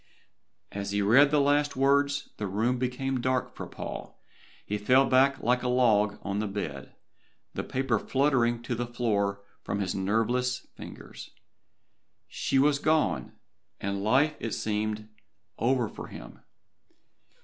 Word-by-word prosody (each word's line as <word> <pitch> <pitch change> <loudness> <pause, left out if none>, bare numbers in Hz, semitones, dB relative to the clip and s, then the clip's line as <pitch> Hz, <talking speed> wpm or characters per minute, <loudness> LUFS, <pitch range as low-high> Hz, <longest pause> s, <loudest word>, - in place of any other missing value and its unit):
As 100 0 -4
he 100 0 0
read 135 +8 +6
the 150 0 +3
last 145 +1 +2
words 140 +1 +2
the 105 - -3
room 115 +6 0
became 130 +1 -2
dark 130 0 -1
for - - -7
Paul, - - -7
and - - -28 0.2
he - - -15
fell 130 +4 +5
back 135 +1 +4
like 125 +2 +2
a 125 - -2
log 110 -5 +3
on 100 +1 -2
the 105 - -1
bed, 80 -9 -6 0.6
the - - -3
paper 130 -4 0
fluttering 125 -4 +1
to 120 - -3
the 120 +1 -3
floor 100 -5 -1 0.2
from 100 - -3
his 95 -2 -1
nerveless 120 +6 0
fingers. - - -10 1.0
She - - -1
was 140 +1 +4
gone 155 +1 +1 0.5
and 100 0 -3
life 140 +8 +3 0.2
seemed 105 0 -2 0.5
over 120 0 +2
for - - -9
him. - - -11
120 Hz, 140 wpm, -28 LUFS, 105-135 Hz, 1.0 s, read